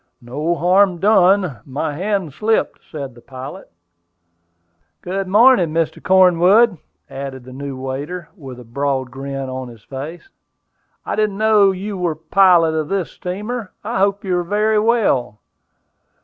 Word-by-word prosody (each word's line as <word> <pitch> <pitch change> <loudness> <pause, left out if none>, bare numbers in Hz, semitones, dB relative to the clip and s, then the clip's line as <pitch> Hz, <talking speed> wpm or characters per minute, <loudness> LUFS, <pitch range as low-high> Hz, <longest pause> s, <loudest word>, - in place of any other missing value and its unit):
"No 150 +8 -2
harm 180 +2 +3
done; 190 - +3
my 145 +3 -3
hand 185 -2 -2
slipped," 215 +8 0
said 140 -5 -6
the 120 - -16
pilot. 135 +9 -9 1.3
"Good 190 +2 -3
morning, 210 -3 +5
Mr. 165 0 -2
Cornwood," 185 +2 +4 0.3
added 135 -2 -7
the 130 +1 -12
new 135 0 -6
waiter, 145 +6 -5
with 135 -8 -10
a - - -10
broad 130 +1 -2
grin 135 +1 -5
on 130 0 -5
his 115 -3 -14
face. 145 - -8 0.8
"I - - -2
didn't 215 -2 0
know 215 -2 +4
you 195 +1 -4
were 175 -3 -1
the 155 - -27
pilot 180 -4 +5
of 155 -1 -1
this 195 -3 -2
steamer. 210 +4 -5
I 220 0 -2
hope 200 +2 +1
you 185 -2 -1
are - - -2
very 210 +4 +1
well." 205 - +1
175 Hz, 150 wpm, -19 LUFS, 135-200 Hz, 1.3 s, morning